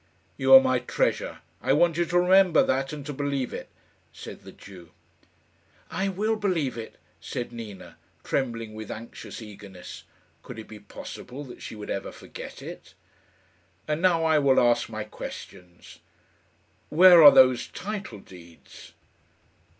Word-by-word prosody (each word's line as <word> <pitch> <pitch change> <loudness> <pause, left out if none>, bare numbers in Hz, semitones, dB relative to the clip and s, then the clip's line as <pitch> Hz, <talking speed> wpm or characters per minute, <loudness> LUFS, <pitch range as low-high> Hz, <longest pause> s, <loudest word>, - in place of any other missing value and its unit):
"You - - 0
are - - +12
my - - +1
treasure. - - -2 0.2
I - - +2
want 170 -2 +3
you 175 +1 +1
to 175 +1 0
remember 185 -1 +5
that, 135 +1 -1
and 150 -2 -7
to 145 - -5
believe 140 -2 -3
it," - - -7 0.4
said - - -10
the - - -12
Jew. 90 -4 -14 1.0
"I 190 +4 -1
will 215 +4 -1
believe 180 -10 -1
it," 115 -1 -8 0.2
said 120 - -5
Nina, 100 -8 -10 0.3
trembling 115 -4 -3
with 110 -1 -8
anxious 115 +1 -9
eagerness. 100 -3 -11 0.4
Could - - -10
it 110 - -9
be 110 - -11
possible 125 +6 -9
that 125 -3 -12
she - - -8
would 105 -1 -7
ever 100 - -4
forget - - -10
it? - - -11 0.9
"And 155 +1 -1
now 175 -3 +3
I 160 -1 +4
will 135 -2 +4
ask 120 -1 +2
my 110 -1 -5
questions. 90 -4 -11 0.9
Where 175 +1 +8
are 150 - +12
those 130 -1 +5
title 195 - -7
deeds?" 85 -3 -15
130 Hz, 150 wpm, -26 LUFS, 110-170 Hz, 1.0 s, are